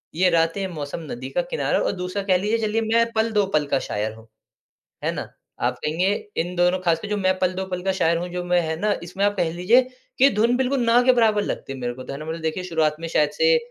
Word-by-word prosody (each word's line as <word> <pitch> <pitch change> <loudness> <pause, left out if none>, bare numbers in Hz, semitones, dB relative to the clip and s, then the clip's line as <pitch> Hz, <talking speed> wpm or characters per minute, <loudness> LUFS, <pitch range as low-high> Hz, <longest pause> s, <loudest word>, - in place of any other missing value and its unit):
ये 180 +2 +4
रातें 165 +3 +1
मौसम 145 +1 -5
नदी 240 - -6
का - - 0
किनारा 485 - 0
और - - 0
दूसरा 185 +2 -3
कह 185 -2 +3
लीजिए 210 +5 0
चलिए 225 +2 0
मैं 230 0 +3
पल 220 +1 +1
दो 205 -2 +2
पल 150 -1 +2
का 135 - +1
शायर 105 +1 -3
हूँ, 110 0 -16 0.8
है - - +2
ना? - - -6 0.3
आप - - +1
कहेंगे 165 +5 0 0.3
इन 175 +2 -2
दोनों 180 +1 +3
खासकर 170 +2 0
जो 210 - -1
मैं 185 -2 +1
पल 185 -1 +1
दो 190 - -3
पल 180 -1 -4
का 190 0 +1
शायर 165 +1 +3
हूँ 175 - -4
जो 180 0 -3
मैं 180 0 +2
है 160 -1 -2
ना 210 -1 +2
इसमें 180 +4 -3
आप 205 0 +1
कह 175 -3 +1
लीजिए 180 +9 +4 0.4
कि 270 - +7
धुन 235 +3 +3
बिल्कुल 265 0 0
ना 230 +1 +5
के 255 +1 +5
बराबर 220 -4 +3
लगती 135 - -4
है 135 - -7
मेरे 120 -1 -3
को 130 - -9
तो - - -7
है 140 - -6
ना 155 - -7
मतलब 160 +1 -5
देखिए 160 +3 -2
शुरुआत 160 -3 +1
में 165 - -4
शायद 150 -2 +2
से 485 0 +4
180 Hz, 265 wpm, -23 LUFS, 165-215 Hz, 0.8 s, कि